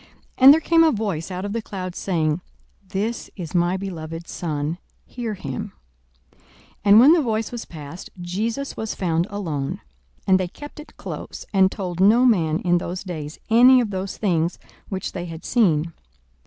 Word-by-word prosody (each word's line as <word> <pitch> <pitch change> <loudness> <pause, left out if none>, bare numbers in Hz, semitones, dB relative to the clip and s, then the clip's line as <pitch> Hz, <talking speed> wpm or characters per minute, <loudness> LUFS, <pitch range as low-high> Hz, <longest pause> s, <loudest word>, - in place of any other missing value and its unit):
42:009:035 - - -24 0.3
And 270 +2 +10
there - - +1
came 330 +1 +4
a 320 - +5
voice 200 - -2
out 185 +1 -4
of 205 - -4
the 230 - -1
cloud, 185 -4 -6
saying, 160 -3 0 0.5
This 210 +4 -3
is 170 -5 -7
my 175 +1 +2
beloved 165 -3 -6
Son: 155 0 -3 0.3
hear 235 -4 -5
him. 140 -9 -6 0.6
42:009:036 - - -32 0.4
And 205 +1 +8
when 275 +7 +8
the 340 - +4
voice 225 -4 -1
was 240 -2 -6
past, 155 +1 -9
Jesus 220 +10 -3
was 220 -1 -4
found 170 -2 0
alone. 160 -9 -3 0.5
And 190 0 +4
they 185 - -1
kept 290 - -11
it 300 0 -13
close, - - -7
and 190 -1 +4
told 180 -3 -5
no 220 +6 +5
man 165 -10 +3
in 175 -1 +2
those 180 +1 -5
days 155 -5 -6
any 250 +3 +7
of 230 -4 -1
those 190 0 -4
things 170 -4 0 0.3
which 190 -2 -3
they 175 -2 -5
had 165 -1 -8
seen. 165 -8 +2
190 Hz, 180 wpm, -23 LUFS, 170-220 Hz, 0.6 s, And